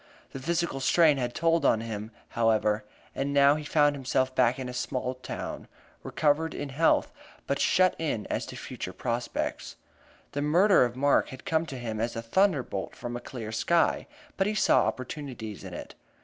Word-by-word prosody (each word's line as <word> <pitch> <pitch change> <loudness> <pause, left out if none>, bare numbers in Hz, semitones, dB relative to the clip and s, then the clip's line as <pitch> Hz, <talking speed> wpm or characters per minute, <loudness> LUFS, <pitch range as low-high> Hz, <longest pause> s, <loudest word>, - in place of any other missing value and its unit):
The 135 - -6
physical 170 0 -1
strain 155 +1 +4
had 120 -1 -2
told 165 0 +2
on 110 - +3
him, 110 -1 -5 0.2
however, 110 -2 +2 0.3
and 140 +1 -2
now 140 0 +6
he 150 0 -4
found 145 -1 +3
himself 130 -1 0
back 125 -1 +3
in 130 -1 -5
a 125 - -6
small 125 0 -2
town, 130 - -6 0.3
recovered 155 +2 0
in 145 - -4
health, 155 +5 +2 0.3
but - - -1
shut 185 0 +4
in 145 -10 -2
as - - -3
to - - -8
future - - -6
prospects. 120 0 -3 0.6
The 145 - -2
murder 170 +1 +5
of 120 0 -4
Mark 140 +2 +3
had 130 - -10
come 160 0 +1
to 135 - -6
him 115 -3 -4
as 115 +2 -2
a 115 - -4
thunderbolt 135 - 0
from 120 0 -6
a - - -3
clear 120 -3 -7
sky, 165 +9 +1 0.3
but 195 - +2
he 215 - -1
saw 215 - +4
opportunities 130 -5 -5
in - - -7
it. - - -8
130 Hz, 180 wpm, -28 LUFS, 120-155 Hz, 0.6 s, now